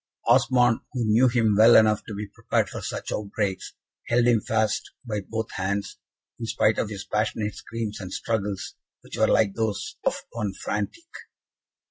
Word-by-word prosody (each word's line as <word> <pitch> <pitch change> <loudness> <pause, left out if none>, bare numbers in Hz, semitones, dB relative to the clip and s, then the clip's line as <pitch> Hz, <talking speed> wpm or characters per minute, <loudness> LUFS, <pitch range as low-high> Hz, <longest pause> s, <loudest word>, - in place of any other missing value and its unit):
Osmond, 125 -2 +4
who 125 -3 -1
knew 110 +4 +5
him 115 -3 +2
well 110 +3 +7
enough 110 -1 +5
to 110 - -6
be 105 +1 -4
prepared 100 - -1
for - - -7
such - - -5
outbreaks, 100 -2 -3 0.3
held 120 0 +3
him 120 -3 +4
fast 110 0 0 0.2
by 105 -3 -2
both 110 +2 -4
hands, 100 +2 -3 0.4
in 115 - -4
spite 110 0 +2
of 110 - -1
his 100 -2 -6
passionate 105 -1 -1
screams 110 0 -5
and 95 -2 -7
struggles, 100 -2 -3 0.3
which - - -9
were - - +3
like 100 -3 +3
those 110 -2 -3
of - - -1
one 105 -4 -3
frantic. 105 - -4
110 Hz, 165 wpm, -25 LUFS, 100-115 Hz, 0.4 s, well